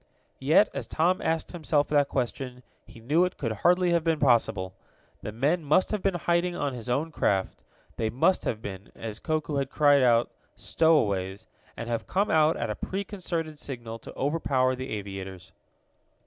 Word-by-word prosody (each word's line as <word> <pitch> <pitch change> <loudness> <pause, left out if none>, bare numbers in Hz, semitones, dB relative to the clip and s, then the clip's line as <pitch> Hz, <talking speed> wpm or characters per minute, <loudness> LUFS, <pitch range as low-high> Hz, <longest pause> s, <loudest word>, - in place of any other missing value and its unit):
Yet, 155 +10 +5
as - - -4
Tom 175 +4 +1
asked 160 -1 -1
himself 155 -4 0
that 145 -2 +3
question, 125 0 -3 0.2
he - - -14
knew 145 +10 +2
it 180 0 -2
could 115 -6 -2
hardly 175 - +2
have 170 -1 +2
been 165 -1 +1
possible. 110 -9 +2 0.5
The 105 - -5
men 145 +10 0
must 150 +5 +2
have 210 -2 -1
been 195 -1 +1
in 175 - -4
hiding 175 +1 +1
on 145 -5 -2
his 125 0 -7
own 145 +7 0
craft, 95 -9 -1 0.3
they 110 -1 0
must 135 +11 +2
have 110 -1 -2
been, 95 0 -8
as 110 -1 -6
Koku 155 -2 -2
had 135 -1 -1
cried 145 -1 +4
out 120 -2 +3 0.2
stowaways 105 - +1 0.3
and 115 - -5
have 115 -1 -3
come 200 +3 0
out 155 0 +4
at - - -2
a - - -3
preconcerted 175 -6 -4
signal 115 -5 -7
to - - -11
overpower 135 -3 +1
the 130 +1 -6
aviators. 95 -3 -7
140 Hz, 175 wpm, -27 LUFS, 115-165 Hz, 0.5 s, Yet